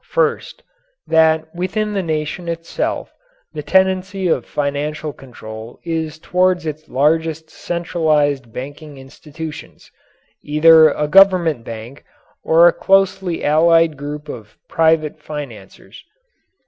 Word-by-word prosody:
First: 470 -2 -1 0.4
that 160 0 +2
within 210 +4 -2
the 195 - -1
nation 160 +1 -3
itself 165 0 -4 0.4
the 155 - -5
tendency 190 +2 +1
of 135 -7 0
financial 150 +1 -3
control 110 -3 -11
is 160 -2 -3
toward 180 +1 0
its 155 0 -6
largest 160 +3 0
centralized 150 -7 -1
banking 145 +4 -9
institutions 150 +4 -10 0.5
either 160 +1 +6
a 150 0 -2
government 175 -6 +4
bank 115 +3 -9 0.4
or 165 +2 +5
a 175 - +4
closely 190 -2 +1
allied 165 +1 +3
group 145 +1 -7
of 110 -7 -10
private 160 -1 +1
financiers. 135 -11 -10
160 Hz, 110 wpm, -18 LUFS, 145-170 Hz, 0.5 s, either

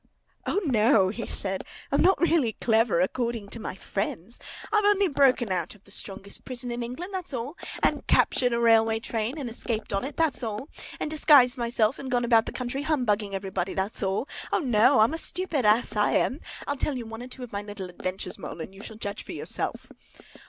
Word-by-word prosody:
O, - - +2
no!" 220 -6 +4
he 230 +4 -5
said. 190 -1 -2 0.3
"I'm 280 - +3
not 380 +2 +4
really 320 -9 +2
clever, 220 -6 +2
according 230 +1 -1
to 230 - -7
my 210 - -5
friends. 195 +2 -4 0.3
I've 425 -1 +4
only 405 -1 +4
broken 265 - +3
out 180 +1 -2
of 200 - -22
the 200 - -14
strongest 195 0 -3
prison 250 -1 -3
in 240 0 -3
England, 260 +12 -6
that's 365 -7 -4
all! 250 +6 -4 0.3
And - - +1
captured 250 -1 +3
a 235 - +1
railway 225 -1 +4
train 225 +4 -3
and 280 -4 -4
escaped 225 -2 -3
on 195 - 0
it, 280 +3 -6
that's 320 -4 +1
all! 225 +4 -4 0.3
And 305 - -3
disguised 290 -5 +6
myself 235 0 +1
and 265 - -6
gone 245 -1 +1
about 230 -2 +4
the - - -3
country 255 +2 -3
humbugging 220 -10 0
everybody, 190 -1 -3
that's 195 +3 -2
all! 195 +6 -1 0.2
O, - - +3
no! 245 - +4
I'm 225 +7 +4
a 325 - 0
stupid 335 -8 0
ass, 220 +1 +3
I 210 0 +2
am! 270 - +1 0.3
I'll 285 - -2
tell 270 0 -1
you 240 - -5
one 225 +1 -8
or 250 - -7
two 255 0 -8
of 245 - -9
my 200 - -2
little 205 -2 -7
adventures, 185 +1 -5
Mole, - - -7
and 190 - -7
you 195 - -12
shall 220 0 -9
judge 205 -2 -4
for - - -8
yourself!" - - -3
235 Hz, 210 wpm, -27 LUFS, 205-270 Hz, 0.3 s, disguised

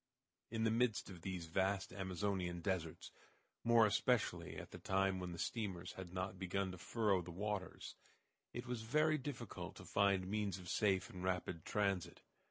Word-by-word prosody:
In 115 0 -1
the 110 - +4
midst 115 -3 +2
of 90 -3 -9
these 90 -2 -3
vast 95 +4 +1
Amazonian 95 -2 -1
deserts, 85 -3 -2 0.5
more 115 -1 +7
especially 115 +2 +2
at - - -7
the - - -8
time 95 0 +2
when 90 -1 -3
the 85 - -5
steamers 90 -1 -2
had 95 -2 -7
not 95 0 -3
begun 95 0 0
to 90 - -8
furrow 105 -2 +2
the 90 - -8
waters, 100 +2 -3 0.6
it 120 +1 -5
was 125 -2 -2
very 155 +7 +3
difficult 120 -10 -5
to 95 - -10
find 100 0 +3
means 100 -1 0
of 90 -2 -8
safe 95 -3 +2
and 90 -1 -6
rapid 90 -3 -1
transit. 100 -4 0
95 Hz, 170 wpm, -39 LUFS, 90-105 Hz, 0.6 s, more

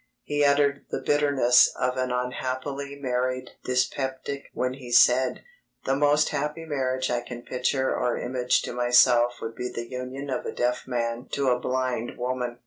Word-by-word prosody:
He 145 0 0
uttered 140 0 +2
the - - -2
bitterness 145 -4 +4
of 125 0 0
an 130 0 -1
unhappily 130 +3 -3
married 130 -1 -2
dyspeptic 130 +2 -2
when 125 0 -2
he 130 -2 -10
said: 125 +1 +4 0.4
"The 135 - +1
most 145 +1 +3
happy 150 +3 -3
marriage 130 -4 -1
I 120 0 0
can 120 0 -9
picture 130 +2 0
or 125 -1 0
image 125 0 0
to - - -5
myself 120 0 +4
would 115 0 -4
be 125 +2 -4
the 120 -1 -6
union 130 +2 -6
of 125 - -2
a - - -4
deaf 125 0 -1
man 120 0 -2
to 140 -2 +1
a 125 0 +2
blind 125 -2 -2
woman." 125 -1 -3
130 Hz, 165 wpm, -26 LUFS, 125-140 Hz, 0.4 s, bitterness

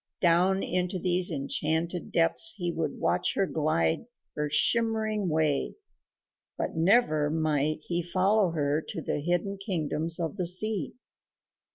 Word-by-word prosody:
Down 180 +2 +3
into 180 +1 -1
these 180 0 +2
enchanted 160 +3 -1
depths 170 - +3
he 175 -3 -2
would 165 -1 -3
watch - - 0
her 195 - +2
glide 155 - 0 0.3
her 150 0 -2
shimmering 215 +3 +1
way, 155 -3 0 0.8
but - - -3
never 160 -4 +3
might 155 -1 0
he 175 0 -1
follow 185 +3 +2
her 150 -2 0
to - - -7
the - - -2
hidden 175 +5 -2
kingdoms 165 -3 -1
of 165 +4 -3
the 180 -3 -1
sea. 185 -2 +1
170 Hz, 135 wpm, -28 LUFS, 155-190 Hz, 0.8 s, Down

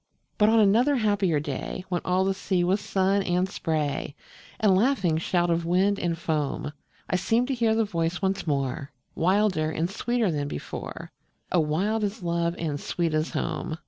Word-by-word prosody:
But 210 0 +5
on 225 0 +5
another 230 +8 +4
happier 205 - +2
day, 150 +5 -5
When 175 -2 -1
all 185 +1 +1
the 195 - +1
sea 190 -2 0
was 190 +4 +1
sun 195 0 +1
and 180 0 +1
spray, 155 -6 -2 0.4
And 205 -3 +4
laughing 190 - +2
shout 175 0 +1
of 170 0 +1
wind 190 +4 +2
and 170 -2 -1
foam, 150 -3 -2 0.4
I 185 - +1
seemed 225 +7 +1
to - - +1
hear 230 -3 +2
the 225 0 +2
voice 170 -2 -1
once 195 -2 -1
more, 140 -1 -2 0.2
Wilder 185 -3 +2
and 160 +1 -1
sweeter 235 -2 0
than 145 -2 -2
before, 75 - -7 0.4
O 180 - +3
wild 190 +9 0
as 200 -2 -3
love 170 0 0
and 150 -4 -2
sweet 170 +1 -2
as 155 +1 0
home. 160 - -3
180 Hz, 175 wpm, -26 LUFS, 165-205 Hz, 0.4 s, But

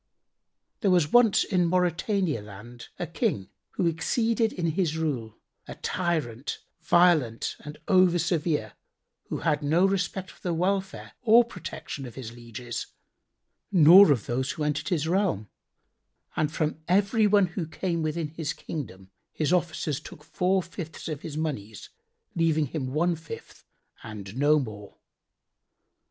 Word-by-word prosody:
There 205 - +1
was 175 -5 +3
once 240 -4 +5
in 180 -3 +1
Mauritania 180 - 0
land[FN#82] 110 +4 -11
a - - -3
King 95 -2 -2 0.2
who 180 - 0
exceeded 225 +7 +1
in 170 -2 -1
his 160 -2 0
rule, 130 -9 -3 0.3
a - - -7
tyrant, 150 -8 -2 0.2
violent 160 -10 +3
and 150 0 -9
over 185 -3 +5
severe, 155 - -1 0.6
who - - -3
had 150 -2 +1
no 160 +6 +3
respect 195 -1 -1
for - - -21
the 175 -3 -1
welfare 190 +2 -1
or 235 0 +6
protection 160 - -7
of 120 - -11
his 125 -4 -7
lieges 120 0 -6 0.8
nor 180 0 +8
of 125 -6 +1
those 130 +2 -1
who 155 - -4
entered 150 +4 -1
his 160 -4 0
realm; 170 - 0 0.9
and 150 -1 0
from 155 -1 -2
everyone 205 +2 +4
who 175 -2 -4
came 170 +1 -2
within 155 0 -2
his 160 0 -4
Kingdom 95 - -7 0.2
his 155 +2 0
officers 165 -5 0
took 165 -5 -12
four 185 +4 0
fifths 170 -2 -8
of 155 -3 -4
his 155 -2 -6
monies, 110 - -4 0.4
leaving 160 -2 +2
him 140 -1 -4
one 170 +4 +1
fifth 160 -1 -10 0.4
and 105 -2 -8
no 145 +3 +4
more. 105 -7 -6
160 Hz, 140 wpm, -27 LUFS, 140-180 Hz, 0.9 s, nor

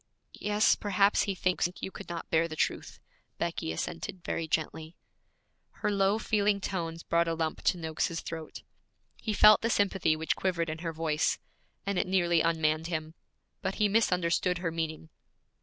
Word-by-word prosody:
'Yes, 210 +1 +2
perhaps 200 0 +2
he 195 - -1
thinks 180 -1 +1
you 190 - -5
could - - -10
not 170 -1 -5
bear 165 +1 +3
the 155 - -7
truth,' - - -2 0.4
Becky 80 - -2
assented 80 - -5
very 165 0 -2
gently. 160 +1 -2 0.9
Her - - +3
low, 200 +1 +2
feeling 210 -2 +1
tones 165 -4 -4
brought 170 0 +2
a 165 - 0
lump 160 -1 -2
to - - +3
Noakes's 165 0 -2
throat. 160 -2 -7 0.5
He 220 - -4
felt 210 +1 +7
the 230 - 0
sympathy 195 -7 +2
which 160 +1 -1
quivered 170 -4 -1
in 160 - -6
her 165 0 -3
voice, 160 -1 0 0.5
and 200 -2 0
it - - 0
nearly 175 -3 +3
unmanned 160 -1 +1
him; 160 -2 -3 0.5
but 190 +1 -2
he 210 - +3
misunderstood 180 -4 +2
her 175 -2 -2
meaning. 160 -1 -4
170 Hz, 165 wpm, -30 LUFS, 160-195 Hz, 0.9 s, felt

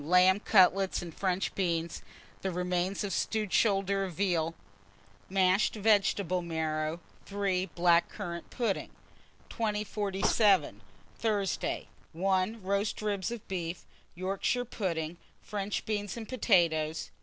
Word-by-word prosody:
Lamb 180 +4 +5
cutlets 195 -2 +4
and 170 -2 -8
French 185 +1 -1
beans; 170 -3 -1 0.4
the 190 - -1
remains 180 +2 -1
of 200 -2 -2
stewed 215 -3 -1
shoulder 195 -2 +2
of 185 -2 -4
veal, 165 -3 0 0.7
mashed 190 +2 +3
vegetable 200 -4 +2
marrow. 160 -1 -2 0.3
3. 195 -2 0
Black 170 -1 +3
currant 170 0 -6
pudding. 230 -6 -1 0.6
2047. 205 - +1 0.4
Thursday. 205 -5 -1 0.3
1. 190 +4 0
Roast 200 +2 0
ribs 200 -3 -1
of 235 -3 -7
beef, 175 -2 -4 0.3
Yorkshire 195 +7 -1
pudding, 170 -7 -3 0.3
French 205 -1 -3
beans 205 -1 -2
and 225 -2 -6
potatoes. 165 -10 +2
190 Hz, 110 wpm, -30 LUFS, 175-205 Hz, 0.7 s, Lamb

